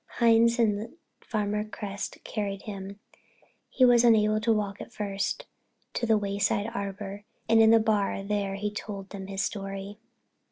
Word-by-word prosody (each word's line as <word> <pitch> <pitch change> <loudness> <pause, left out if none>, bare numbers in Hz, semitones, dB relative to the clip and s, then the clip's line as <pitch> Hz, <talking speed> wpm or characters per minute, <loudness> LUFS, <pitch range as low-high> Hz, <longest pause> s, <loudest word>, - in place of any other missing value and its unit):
Hines 230 0 +5
and 225 +4 0 0.2
Farmer 210 -1 -1
Cresset 205 -2 -6
carried 200 -2 -4
him—he 200 +5 -4
was 240 -1 +6
unable 215 -2 +4
to 230 +1 +2
walk 205 -2 -1
at - - -9
first—to 205 +2 -5
the 220 -1 +4
Wayside 205 +1 0
Arbor 200 -1 -5 0.2
and 225 0 +5
in 220 - +7
the 225 0 +7
bar 210 -3 0
there 200 -1 -1
he 205 +1 -2
told 200 -2 -7
them 195 -2 -7
his 195 0 -2
story. 195 0 -5
210 Hz, 145 wpm, -28 LUFS, 200-225 Hz, 0.2 s, in